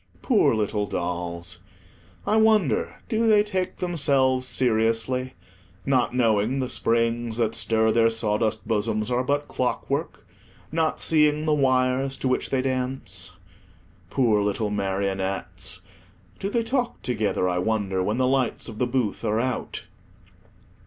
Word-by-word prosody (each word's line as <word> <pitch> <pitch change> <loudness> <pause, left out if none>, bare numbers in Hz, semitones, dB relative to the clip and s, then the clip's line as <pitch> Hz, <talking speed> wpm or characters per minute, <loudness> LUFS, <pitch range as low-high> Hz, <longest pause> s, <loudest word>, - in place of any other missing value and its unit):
Poor 205 - +3
little 105 -1 -1
dolls! 85 -2 -4 0.7
I 215 - +2
wonder 185 - +2
do 225 +1 +1
they 210 -1 +5
take 185 -3 -2
themselves 140 -7 +2
seriously, 120 +1 +1 0.5
not 125 -3 +1
knowing 115 0 +2
the 130 -2 -2
springs 115 0 0
that 115 -2 +1
stir 110 0 +2
their 115 0 +4
sawdust 110 -1 -1
bosoms 110 +1 0
are 125 +1 +1
but 145 +2 -1
clockwork, 135 0 -2 0.5
not 160 0 0
seeing 150 -1 +3
the 155 - +2
wires 135 -1 +1
to - - -2
which 130 - 0
they 130 -1 0
dance? 125 -8 -3 0.8
Poor 115 -6 +2
little 105 +1 -1
marionettes! 95 -1 -2 0.6
do 195 - -2
they 230 +2 0
talk 245 +1 -2
together, 110 -6 0
I 90 -1 0
wonder, 100 -2 0
when 105 +4 -1
the 130 - +2
lights 130 -1 0
of 105 - -8
the 125 - +1
booth 120 -4 -1
are 110 0 +1
out? 130 0 -3
120 Hz, 135 wpm, -25 LUFS, 105-135 Hz, 0.8 s, they